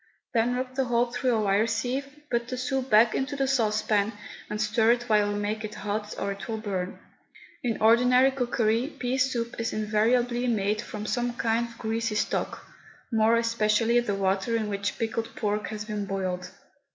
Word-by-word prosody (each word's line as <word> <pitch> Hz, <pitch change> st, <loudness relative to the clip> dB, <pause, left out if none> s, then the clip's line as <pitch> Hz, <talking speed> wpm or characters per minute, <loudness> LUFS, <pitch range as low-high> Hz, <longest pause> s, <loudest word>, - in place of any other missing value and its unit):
Then 240 Hz, +1 st, +2 dB
rub 255 Hz, 0 st, -3 dB
the 265 Hz, 0 st, 0 dB
whole 240 Hz, 0 st, +1 dB
through 250 Hz, 0 st, +1 dB
a -, -, +1 dB
wire 205 Hz, +2 st, +2 dB
sieve, 245 Hz, +5 st, -1 dB, 0.2 s
put 235 Hz, -1 st, 0 dB
the 255 Hz, 0 st, -4 dB
soup 265 Hz, +1 st, -2 dB
back 220 Hz, +2 st, +6 dB
into 280 Hz, +2 st, -1 dB
the 270 Hz, -1 st, 0 dB
saucepan, 215 Hz, -4 st, +1 dB, 0.4 s
and 210 Hz, -, -3 dB
stir 220 Hz, +2 st, +3 dB
it 240 Hz, 0 st, -3 dB
while 210 Hz, -3 st, +2 dB
you 205 Hz, -, -2 dB
make 210 Hz, +1 st, -2 dB
it 215 Hz, 0 st, -6 dB
hot 210 Hz, +1 st, -3 dB
or 200 Hz, -, -2 dB
it 195 Hz, 0 st, -7 dB
will 225 Hz, -1 st, -2 dB
burn. 195 Hz, -4 st, -3 dB, 0.6 s
In 235 Hz, -3 st, -1 dB
ordinary 250 Hz, +4 st, +5 dB
cookery, 240 Hz, 0 st, 0 dB
pea 255 Hz, +2 st, -1 dB
soup 240 Hz, -4 st, -1 dB
is 230 Hz, -, -1 dB
invariably 240 Hz, +3 st, +1 dB
made 210 Hz, -2 st, +1 dB
from 210 Hz, -2 st, -6 dB
some 245 Hz, +2 st, -1 dB
kind 230 Hz, 0 st, 0 dB
of 230 Hz, 0 st, -14 dB
greasy 225 Hz, 0 st, -2 dB
stock, -, -, -2 dB, 0.5 s
more 225 Hz, 0 st, +4 dB
especially 230 Hz, 0 st, +2 dB
the 210 Hz, -4 st, -1 dB
water 195 Hz, +3 st, 0 dB
in 220 Hz, -2 st, -1 dB
which 200 Hz, 0 st, -2 dB
pickled 225 Hz, 0 st, -3 dB
pork 210 Hz, -1 st, -1 dB
has 215 Hz, -1 st, -5 dB
been 210 Hz, -2 st, -3 dB
boiled. 185 Hz, -2 st, -3 dB
225 Hz, 185 wpm, -27 LUFS, 210-245 Hz, 0.6 s, back